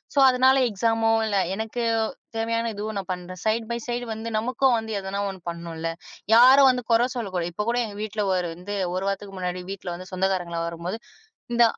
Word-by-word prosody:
So - - +4
அதனால 260 +1 +5
எக்ஸாம்மோ, 225 +2 +1 0.2
இல்ல, 205 -2 +1 0.2
எனக்கு 220 +3 -3 0.5
தேவையான 230 0 0
இதுவும் 210 +1 -4
நான் 190 -1 -8
பண்றேன். 180 0 -8
சைடு 220 +1 +1
பை 235 - -1
சைடு 240 0 -2
வந்து 220 +1 -5
நமக்கும் 255 +3 +2
வந்து 220 0 -6
எதனா 195 +1 -3
ஒண்ணு 190 -1 -8
பண்ணனும்ல! 165 -1 -5 0.5
யாரும் 260 +3 +8
வந்து 250 -1 -3
கொற 230 +2 +5
சொல்லக் 200 -6 -4
கூடாது. 175 -1 -1
இப்ப 210 +4 -2
கூட 240 +1 +1
எங்க 205 -2 -8
வீட்ல 215 0 -2
ஒரு 180 -1 0
வந்து, 190 +4 -6 0.2
1 185 - -1
வாரத்துக்கு 195 0 -5
முன்னாடி 180 0 -3
வீட்ல 185 -2 -5
வந்து 185 +3 -10
சொந்தக்காரங்கலாம் 180 -3 -1
வரும்போது, 170 +6 -5 0.5
இந்த 235 - +5
205 Hz, 190 wpm, -25 LUFS, 185-230 Hz, 0.5 s, யாரும்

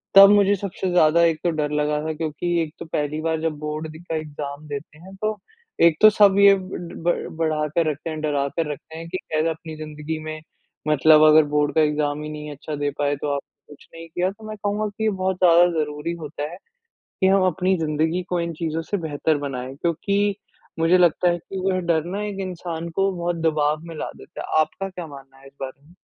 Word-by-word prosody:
तब 195 0 +11
मुझे 205 -1 +5
सबसे 190 -1 -4
ज़्यादा 170 -1 +5
एक 165 -2 +2
तो 175 - +2
डर 150 -2 -1
लगा 150 0 0
था 160 0 -2
क्योंकि 155 +1 -4
एक 155 -2 -4
तो - - -6
पहली 150 -1 -2
बार 160 -1 0
जब 160 -1 0
बोर्ड 155 +1 -4
दी 155 - -11
का 170 -2 -5
एग्ज़ाम 150 -1 -6
देते 145 +1 -7
हैं 190 +3 -12
तो 215 0 -1 0.5
एक 165 -2 +5
तो 215 - +10
सब 205 -2 +5
ये 200 0 +8
ब 180 -3 -7
ब 175 - -1
बढ़ाकर 155 0 0
रखते 155 +2 -4
हैं, 155 -1 -4
डरा 145 -2 0
कर 150 +1 -2
रखते 160 +2 -9
हैं 165 0 -7
कि 185 - -2
कैसे 155 +1 +1
अपनी 160 0 -6
ज़िंदगी 155 +1 -5
में, 155 0 -6 0.5
मतलब 155 +1 +6
अगर 155 +1 +7
बोर्ड 150 0 +2
का 160 - +5
एग्ज़ाम 150 -1 0
ही 150 - -5
नहीं 150 0 -7
अच्छा 150 +1 -6
दे 145 0 -1
पाए 145 0 +1
तो 145 - -3
आपने 140 +1 -10
कुछ - - -21
नहीं 165 0 -9
किया। 180 +3 0
तो 215 +2 -12
मैं 215 - -5
कहूँगा 210 +1 0
कि 205 +2 -6
ये 220 - +3
बहुत 190 -2 -1
ज़्यादा 175 0 +7
ज़रूरी 150 +2 -3
होता 150 0 -5
है, 175 - -9 0.6
कि 190 - +5
हम 195 0 +4
अपनी 185 +2 +1
ज़िंदगी 160 +3 0
को 180 - 0
इन 170 0 -3
चीज़ों 165 0 -3
से 205 - +2
बेहतर 155 -2 0
बनाएँ 135 -2 -5
क्योंकि 200 +6 0 0.4
मुझे 165 +3 +5
लगता 175 0 +4
है 175 - +1
कि 190 +3 -8
वो 185 -1 +1
डर 160 -1 +1
ना 210 - -2
एक 200 -2 -5
इंसान 170 -2 -5
को 195 0 +2
बहुत 175 0 -1
दबाव 150 -1 +1
में 165 -1 -8
ला - - -4
देता 165 - -10
है। 155 - +3
आपका 195 +5 -3
क्या 180 -3 -7
मानना 135 -2 -13
है 135 - -15
इस 135 - -17
बारे 135 +1 -6
में? 175 - -19
160 Hz, 230 wpm, -23 LUFS, 150-180 Hz, 0.6 s, तब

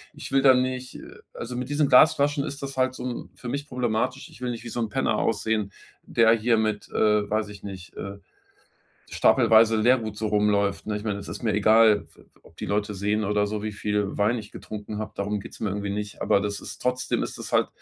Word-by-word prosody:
Ich - - -8
will 135 0 +4
da 135 -1 +7
nicht, 130 0 -2
äh - - -11 0.2
also, 120 +1 -6
mit 125 +1 -4
diesen 145 0 +2
Glasflaschen 145 +1 +5
ist 140 0 -6
das 135 -1 -6
halt 130 0 +1
so - - -7
'n 125 - -5
für 125 - -9
mich 140 +2 -4
problematisch. 125 +1 -2
Ich - - -16
will 125 - -2
nicht 115 -1 -7
wie 120 - -7
so 120 - -4
'n 115 - -1
Penner - - 0
aussehen, 110 -3 0 0.3
der 115 -1 +3
hier 115 +1 +2
mit, 110 -1 -1
äh, 105 -1 +2
weiß 105 0 -1
ich 100 - -11
nicht, 95 -3 -9
äh, 100 0 -6 0.9
stapelweise 115 -2 +5
Lehrgut 110 -2 +2
so 110 - -2
rumläuft, 105 -1 +1
ne? 105 - -1
Ich 105 - -8
meine, 105 -2 -2
es 100 - -9
ist - - -7
mir 110 - +1
egal, 110 0 +5
f - - -24
f - - -19 0.2
ob - - -20
die - - -5
Leute 105 0 -1
sehen 105 +2 0
oder 105 0 +1
so, 105 0 -3
wie 110 - -2
viel 105 -1 -2
Wein 105 +4 +2
ich 105 -1 -11
getrunken 105 0 -7
habe, 110 0 -4
darum 100 +1 -2
geht's - - -11
mir 110 - -1
irgendwie 100 +1 -3
nicht. 105 0 -5
Aber 100 - +3
das 100 0 -3
ist - - -9
trotzdem 125 0 0
ist - - -6
es - - -7
halt, - - +3
110 Hz, 235 wpm, -25 LUFS, 105-125 Hz, 0.9 s, da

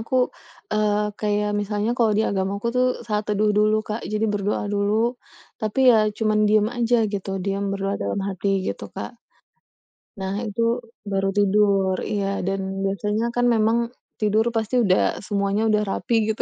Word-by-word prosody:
aku, 230 +4 -5 0.6
eee, 210 0 +1
kayak 210 0 0
misalnya 205 +2 -1
kalau 225 -2 +3
di - - +3
agamaku 200 +2 -2
tuh 255 0 +4 0.2
saat 210 -1 0
teduh 210 0 +2
dulu 215 0 +4
Kak, 215 +2 -3
jadi 215 +1 0
berdoa 205 0 -1
dulu 200 +1 +1 0.7
tapi 215 +3 -3
ya - - +5 0.2
cuman 215 -1 +2
diam 215 0 +4
aja 240 0 +2 0.2
gitu 200 -1 -4 0.2
diam 200 0 -1
berdoa 195 0 -2
dalam 100 - -2
hati 195 0 -3 0.2
gitu - - -4
Kak. - - -4 1.1
Nah 190 0 -3
itu 210 +2 -3 0.5
baru 195 0 +1
tidur 200 -2 +3 0.2
iya 205 -2 0 0.2
dan 195 0 0 0.2
biasanya 205 +3 -1
kan 245 - +2
memang 220 +1 +3 0.4
tidur 215 0 +2
pasti 225 +2 -1
udah 185 -3 +3 0.3
semuanya 200 0 0
udah 210 -1 +3
rapi 230 +4 -1 0.2
gitu 215 - -3
210 Hz, 155 wpm, -23 LUFS, 200-215 Hz, 1.1 s, ya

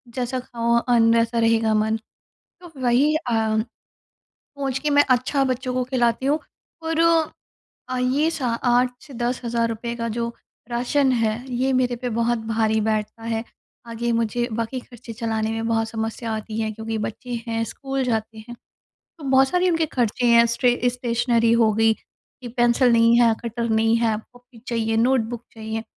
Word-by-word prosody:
जैसा 255 0 -2
खाओ 235 -2 -1
अन्न 230 -1 +3
वैसा 230 0 +1
रहेगा 225 -1 +3
मन, 215 +1 +1 0.6
तो 350 -2 -13
वही 255 +5 +3
अ, 310 - 0 1.4
पहुँच 270 -2 -2
के 300 - -1
मैं 290 0 +5
अच्छा 255 +2 +2
बच्चों 255 0 -2
को 255 0 0
खिलाती 245 -1 0
हूँ। 295 +2 +2 0.4
और 325 0 -1 0.9
अ, 255 - -2
ये 270 +6 +2
सा 290 -7 -2
8 245 +1 +2
से 280 - -13
₹10,000 235 -1 -2
का 230 0 -3
जो 235 +1 -3 0.4
राशन 255 +3 +1
है, 230 0 0
ये 260 +2 +1
मेरे 250 -1 +1
पे 245 +1 -4
बहुत 235 +1 0
भारी 220 -1 +1
बैठता 215 +1 -2
है। 225 0 -2 0.4
आगे 235 +1 -2
मुझे 230 +1 0
बाकी 230 +3 -3
ख़र्चे 240 -1 -11
चलाने 220 -1 -2
में 225 0 -3
बहुत 225 -1 +1
समस्या 225 +1 -4
आती 220 0 -4
है 220 -1 -1
क्योंकि 220 +1 -4
बच्चे 225 +3 -5
हैं 225 0 -1
स्कूल 270 +3 -4
जाते 220 -2 -2
हैं, 240 - -7 0.6
तो 315 - -12
बहुत 265 0 +5
सारे 360 +2 +2
उनके 330 -2 +1
ख़र्चे 245 -4 -1
हैं 235 0 +6
स्ट्रे 240 +1 +1
स्टेशनरी 240 -1 +1
हो 230 -2 +4
गई, 225 +1 +3
कि 250 +3 -16
पेंसिल 240 +1 +3
नहीं 230 +1 +5
है, 235 -2 +5
कटर 235 0 -3
नहीं 225 +1 +3
है, 230 -2 +1 0.2
कॉपी 245 -1 -18
चाहिए, 225 -1 0
नोटबुक 240 -1 +1
चाहिए। 220 0 -5
235 Hz, 165 wpm, -23 LUFS, 225-255 Hz, 1.4 s, हैं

